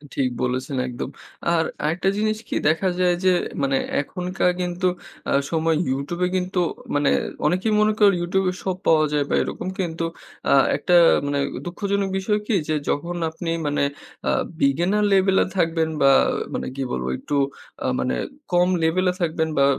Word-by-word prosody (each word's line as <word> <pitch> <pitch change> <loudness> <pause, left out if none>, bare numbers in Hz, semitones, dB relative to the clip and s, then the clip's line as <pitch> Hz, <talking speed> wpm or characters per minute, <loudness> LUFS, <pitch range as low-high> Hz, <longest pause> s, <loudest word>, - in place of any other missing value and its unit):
ঠিক 130 -2 +1
বলেছেন 130 +2 -2
একদম। 125 +1 -5 0.4
আর 165 -1 +3 0.2
আরেকটা 170 +5 +1
জিনিস 215 0 +1
কি - - -3
দেখা 165 +4 +2
যায় 180 -1 +3
যে 185 - +6 0.3
মানে 135 0 +2 0.2
এখনকার 180 +3 -1
কিন্তু 180 +1 -1 0.4
অ্যাঁ 140 - +2
সময় 160 0 +2 0.2
YouTube 145 +7 -3
এ - - +2
কিন্তু 180 0 -1 0.4
মানে 145 -1 +3 0.4
অনেকেই 185 +7 +1
মনে 215 0 +3
করে 200 -2 +6
YouTube 190 +2 0
এ - - -7
সব 185 -2 -1
পাওয়া 155 -1 +5
যায় 145 -1 +2
বা - - +2
এরকম - - -5
কিন্তু 165 -2 -2 0.4
অ্যা - - +4 0.2
একটা 180 - +2 0.3
মানে 145 0 0 0.3
দুঃখজনক 200 +2 -1
বিষয় 210 +2 0
কি 225 - +2
যে 155 - +1
যখন 170 +4 -1
আপনি 165 +1 -6 0.2
মানে 145 0 +1 0.4
অ্যা - - +2 0.3
beginner 175 +10 +2
level 190 0 +4
এ - - -3
থাকবেন 165 -2 +1
বা 135 - +6 0.4
মানে - - -3
কি 135 - -2
বলবো 65 0 -2
একটু 145 - -4 0.5
আ - - +1
মানে 125 - 0 0.4
কম 180 +1 +4
level 170 +3 +2
এ - - -7
থাকবেন 160 -1 0
বা 140 - +5
175 Hz, 175 wpm, -23 LUFS, 145-185 Hz, 0.5 s, যে